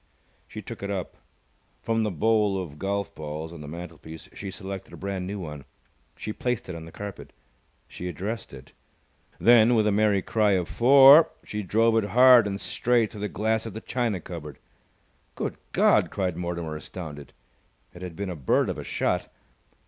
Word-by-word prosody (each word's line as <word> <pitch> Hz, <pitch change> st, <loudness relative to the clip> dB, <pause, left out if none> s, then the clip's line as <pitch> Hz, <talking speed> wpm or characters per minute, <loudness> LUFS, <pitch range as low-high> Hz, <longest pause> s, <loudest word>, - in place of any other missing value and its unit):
She -, -, -9 dB
took -, -, -8 dB
it 100 Hz, -, -4 dB
up. 95 Hz, -3 st, -4 dB, 0.7 s
From 115 Hz, 0 st, 0 dB
the 110 Hz, -, 0 dB
bowl 105 Hz, +2 st, +2 dB
of 75 Hz, -5 st, -7 dB
golf 100 Hz, +1 st, -2 dB
balls 80 Hz, +2 st, -6 dB
on 85 Hz, -, -10 dB
the 75 Hz, -, -8 dB
mantelpiece 80 Hz, 0 st, -9 dB
she 100 Hz, -, -7 dB
selected 95 Hz, 0 st, -8 dB
a -, -, -9 dB
brand 95 Hz, -2 st, -4 dB
new 100 Hz, +1 st, -4 dB
one. 75 Hz, -5 st, -7 dB, 0.5 s
She 105 Hz, -, -5 dB
placed 125 Hz, -1 st, -2 dB
it 90 Hz, -, -5 dB
on 80 Hz, -1 st, -8 dB
the 80 Hz, -, -11 dB
carpet. 100 Hz, +1 st, -8 dB, 0.6 s
She 90 Hz, -, -7 dB
addressed 105 Hz, +6 st, -5 dB
it. 65 Hz, -1 st, -12 dB, 0.7 s
Then, 120 Hz, 0 st, +6 dB
with 110 Hz, -2 st, +3 dB
a 105 Hz, -, +3 dB
merry 100 Hz, -2 st, +2 dB
cry 105 Hz, -2 st, +2 dB
of 90 Hz, -3 st, 0 dB
"Fore!" 140 Hz, -, +7 dB, 0.2 s
she 105 Hz, -, -4 dB
drove 115 Hz, +3 st, +2 dB
it 105 Hz, -2 st, 0 dB
hard 125 Hz, -3 st, +8 dB
and 100 Hz, -1 st, -3 dB
straight 120 Hz, 0 st, +1 dB
through 105 Hz, -, -9 dB
the 105 Hz, -, -2 dB
glass 110 Hz, +2 st, -1 dB
of 110 Hz, -, -7 dB
the 110 Hz, -, -6 dB
china 120 Hz, -7 st, -1 dB
cupboard. 75 Hz, -5 st, -8 dB, 0.8 s
"Good -, -, -3 dB, 0.2 s
God!" -, -, +4 dB
cried 90 Hz, -4 st, -2 dB
Mortimer, 85 Hz, -2 st, -4 dB
astounded. 75 Hz, -2 st, -8 dB, 0.6 s
It 90 Hz, -, -12 dB
had 90 Hz, -3 st, -7 dB
been 100 Hz, 0 st, -4 dB
a -, -, -5 dB
bird 70 Hz, -6 st, +1 dB
of -, -, -4 dB
a -, -, -6 dB
shot. -, -, -1 dB
100 Hz, 185 wpm, -26 LUFS, 85-110 Hz, 0.8 s, hard